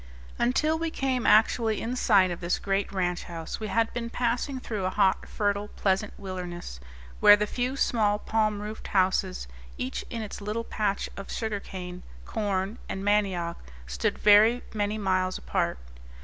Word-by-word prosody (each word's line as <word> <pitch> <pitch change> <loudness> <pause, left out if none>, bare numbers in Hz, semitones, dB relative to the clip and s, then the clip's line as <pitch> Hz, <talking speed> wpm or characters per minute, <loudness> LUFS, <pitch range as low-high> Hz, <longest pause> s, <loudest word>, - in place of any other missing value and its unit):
Until 305 +7 +2
we 330 0 -1
came 265 -5 -1
actually 220 0 +4
in 240 +2 -3
sight 195 -7 +4
of 175 - -4
this 175 +1 0
great 195 0 -1
ranch 180 -2 -1
house 165 -2 -6
we 215 - -4
had 230 +1 +1
been 235 -1 -3
passing 245 +3 -1
through 215 -6 -3
a - - +2
hot, 190 -1 +1
fertile, 205 0 -1
pleasant 195 0 0
wilderness, 180 - -6 0.4
where 205 - +9
the 210 0 0
few 250 +5 -2
small 210 -6 +2
palm 215 -1 0
roofed 215 +1 -7
houses, 185 - +1 0.3
each 130 - -3
in 230 -3 -4
its 210 - -7
little 210 +3 -2
patch 205 -3 -1
of 195 - -8
sugar 220 -3 -2
cane, 180 -2 -7 0.2
corn, 200 0 -2
and 195 +1 -4
mandioc, 190 -5 +1 0.3
stood - - -1
very 215 +4 +6
many 210 0 -1
miles 185 -2 0
apart. - - -1
205 Hz, 165 wpm, -27 LUFS, 185-225 Hz, 0.4 s, where